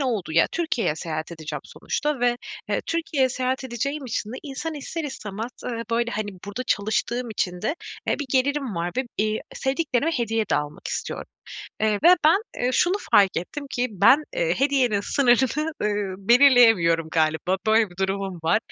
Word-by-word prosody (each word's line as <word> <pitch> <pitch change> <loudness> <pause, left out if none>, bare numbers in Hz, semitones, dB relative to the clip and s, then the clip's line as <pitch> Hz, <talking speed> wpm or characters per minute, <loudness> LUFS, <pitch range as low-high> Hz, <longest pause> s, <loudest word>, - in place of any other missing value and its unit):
olduğu 225 - -1
ya, 165 +1 +5
Türkiye'ye 280 - 0
seyahat 155 0 -4
edeceğim 160 -2 -6
sonuçta 295 -4 -3
ve, 245 0 +2 0.3
eee, - - 0
Türkiye'ye 325 -5 +1
seyahat 255 +1 -2
edeceğim 275 +4 -3
için 220 -2 -3
de 255 - -5
insan 305 +2 -5
ister 315 +3 -5
istemez 220 -4 -5
eee, 230 -1 -3
böyle, 235 +1 +1
hani, 215 -2 -3 0.2
burada 205 +5 -4
çalıştığım 230 +2 -1
için 180 -3 -2
de 285 +8 0 0.3
bir 290 - 0
gelirim 270 -3 +1
var, 170 +1 -2
eee, 260 - +1 0.3
ve 215 - -2
sevdiklerime 275 +1 0
hediye 225 -5 0
de - - +3
almak 150 0 -4
istiyorum, - - -4 0.6
ııı, 220 - +4
ve 355 +2 +8
ben, 335 +7 +5
eee, 250 +1 0
şunu 355 +8 +3 0.2
fark 195 -2 +5
ettim 280 - -4
ki 245 0 0
ben, 265 +9 +5
eee, - - +1
hediyenin 260 -7 +2
sınırını, 265 +6 +2
ııı, 205 -2 -1
belirleyemiyorum 225 - +6
galiba. 160 +3 +1
Böyle 220 -2 +4
bir 175 - -16
durumum 190 -2 -2
var 165 +7 +3
240 Hz, 165 wpm, -24 LUFS, 195-275 Hz, 0.6 s, ve